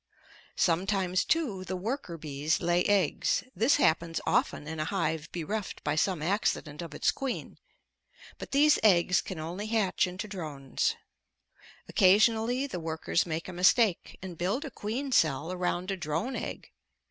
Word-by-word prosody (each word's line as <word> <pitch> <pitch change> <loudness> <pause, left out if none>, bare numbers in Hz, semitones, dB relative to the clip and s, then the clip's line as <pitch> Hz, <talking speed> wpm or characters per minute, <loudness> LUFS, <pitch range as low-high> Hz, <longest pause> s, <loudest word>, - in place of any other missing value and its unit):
Sometimes, 185 +1 +1
too, 250 - 0
the 185 0 -4
worker 195 - -4
bees 150 0 -1
lay 175 0 +2
eggs 195 -7 +2
this 230 +9 +4
happens 165 - +1
often 150 - 0
in 160 0 -5
a 155 - -1
hive 160 -3 -2
bereft 190 +5 -4
by 145 - 0
some 165 0 0
accident 165 -5 -1
of 165 -3 -8
its - - +2
queen 270 -2 -5 0.8
but - - -7
these 295 +2 +4
eggs 180 -3 +4
can 190 - -7
only 175 +7 -5
hatch 215 -5 +1
into 185 +5 -6
drones. 155 -9 -2 0.9
Occasionally 225 +6 +3
the 260 -10 -5
workers 160 +2 -1
make 160 0 -3
a 185 - -7
mistake 185 +2 +3
and 180 -3 -8
build 200 - -1
a 285 - -7
queen 250 +7 -4
cell 160 - +2
around 180 +1 -2
a 195 - -2
drone 170 - -2
egg. - - -6
180 Hz, 150 wpm, -29 LUFS, 165-215 Hz, 0.9 s, this